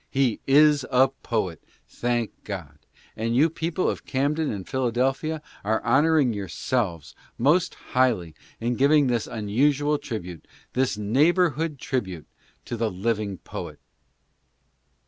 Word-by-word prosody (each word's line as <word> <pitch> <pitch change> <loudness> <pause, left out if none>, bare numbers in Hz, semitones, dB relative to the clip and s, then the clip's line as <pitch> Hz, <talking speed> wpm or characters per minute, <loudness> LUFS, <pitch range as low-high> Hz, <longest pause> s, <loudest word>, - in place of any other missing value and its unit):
He 135 -4 +1
is 145 0 +5
a 130 0 +4
poet, 110 - -3 0.2
thank 120 -2 -1
God! 85 -8 -7 0.4
and 115 +2 -1
you 150 +5 +4
people 165 +2 -1
of - - -2
Camden 145 +3 0
and 100 -3 -6
Philadelphia 130 +5 -1 0.2
are 110 +2 +1
honoring 150 -4 +3
yourselves 100 - -2 0.2
most 160 +8 +2 0.2
highly 115 -11 +2 0.3
in 120 +1 -1
giving 145 +2 +5
this 120 -3 0
unusual 140 +7 +1
tribute, 90 - -7 0.3
this 130 -4 +1
neighborhood 150 - +2
tribute, 95 - -3 0.4
to - - -4
the 115 -1 0
living 100 0 -2
poet. - - -8
125 Hz, 120 wpm, -25 LUFS, 105-145 Hz, 0.4 s, is